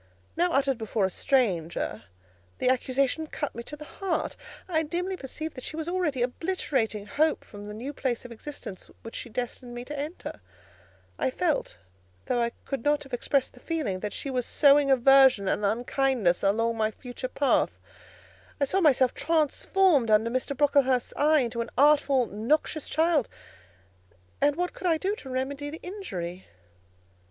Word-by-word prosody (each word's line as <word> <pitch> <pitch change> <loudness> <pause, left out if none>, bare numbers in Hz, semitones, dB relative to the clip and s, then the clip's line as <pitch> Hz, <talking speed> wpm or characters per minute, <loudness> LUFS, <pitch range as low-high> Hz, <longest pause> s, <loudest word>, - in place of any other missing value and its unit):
Now, 350 +1 +2
uttered 270 -2 +2
before 220 -2 0
a 190 - -1
stranger, 175 - 0 0.5
the 255 - +1
accusation 265 +4 +1
cut 290 -1 -4
me 235 - -6
to 295 - -8
the 300 0 -10
heart; 340 +3 -2 0.3
I 325 -4 +1
dimly 355 +4 -2
perceived 310 +1 -5
that 255 - -9
she - - -4
was 320 0 -4
already 340 -8 0
obliterating 250 - -1
hope 305 +8 +1
from 205 -1 -11
the 210 - -7
new 260 +6 -5
phase 250 -4 -2
of 245 - -9
existence 235 -5 -8
which 225 - -9
she 240 - -6
destined 245 +1 -5
me 240 0 -6
to 295 +1 -5
enter; 300 +5 -6 0.8
I - - +1
felt, 315 - -1 0.5
though 245 - +1
I 235 - +1 0.2
could 275 -4 -4
not 295 0 +2
have 270 -2 -16
expressed 270 +2 0
the - - -16
feeling, 290 - -2
that 210 +1 -4
she 275 - -4
was 250 -1 0
sowing 285 -1 +5
aversion 265 -5 +6
and 210 - 0
unkindness 235 -2 +1
along 225 +3 +1
my 215 -1 +2
future 245 +3 -7
path; 275 +2 +1 0.8
I 280 - +3
saw 380 +8 +1
myself 265 -6 +4
transformed 320 - +2
under 220 +2 +4
Mr. 255 +2 -2
Brocklehurst's 270 -3 +3
eye 305 0 +4
into 235 -1 -2
an 230 - -4
artful, 280 -2 +4
noxious 265 +8 -1
child, 320 -4 +2 1.1
and 285 0 +3
what 355 +2 -2
could 370 - -4
I 330 -2 +3
do 390 +5 -1
to 270 - -10
remedy 275 +3 -3
the 320 +2 -8
injury? 190 - -6
270 Hz, 165 wpm, -27 LUFS, 235-305 Hz, 1.1 s, aversion